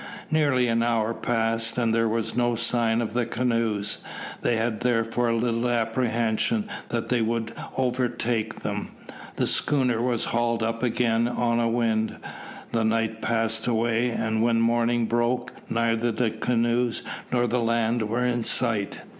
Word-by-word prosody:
Nearly 140 -5 +3
an 115 0 +2
hour 115 -1 +1
passed, 115 -1 -1
and 115 -2 +2
there 115 0 +2
were 115 +1 0
no 120 -1 +2
signs 115 0 +2
of 110 - -4
the 120 -1 0
canoes. 115 -4 0 0.4
They 120 - +1
had 110 -1 -1
therefore 120 0 +1
little 115 +1 0
apprehension 120 - 0 0.2
that 115 -1 -2
they 125 -2 +2
would 115 0 -1 0.2
overtake 120 -3 -1
them. - - -3 0.5
The - - +1
schooner 125 -5 +2
was 120 -2 0
hauled 115 -1 0
up 115 0 -2
again 115 -1 +1
on 120 -1 0
a 115 -1 +2
wind. 115 -2 0 0.6
The 115 -1 +1
night 110 0 0
passed 115 0 0
away, 115 +1 +1
and 110 -1 -1
when 115 0 +3
morning 120 0 +2
broke 120 +2 0 0.2
neither 115 0 +1
the 115 0 0
canoes 120 +1 0 0.3
nor 120 -1 +2
the 120 +1 0
land 115 -1 +1
were 120 +3 0
in 120 -1 0
sight. 115 -3 -1
115 Hz, 150 wpm, -25 LUFS, 115-120 Hz, 0.6 s, Nearly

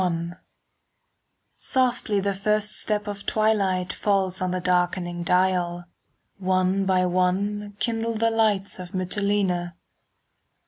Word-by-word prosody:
XXI 170 -1 -2 1.2
Softly 245 -5 +1
the 200 0 0
first 210 +2 0
step 210 -1 -1
of 205 -1 -6
twilight 200 -4 +1
Falls 190 -3 0
on 185 - 0
the 185 0 -1
darkening 180 -1 0
dial, 175 0 +1 0.5
One 185 +1 +1
by 185 -1 +2
one 200 +3 0
kindle 230 0 -1
the 230 +1 +2
lights 210 -4 +1
In 180 - -6
Mitylene. 185 -2 0
190 Hz, 110 wpm, -24 LUFS, 180-210 Hz, 1.2 s, by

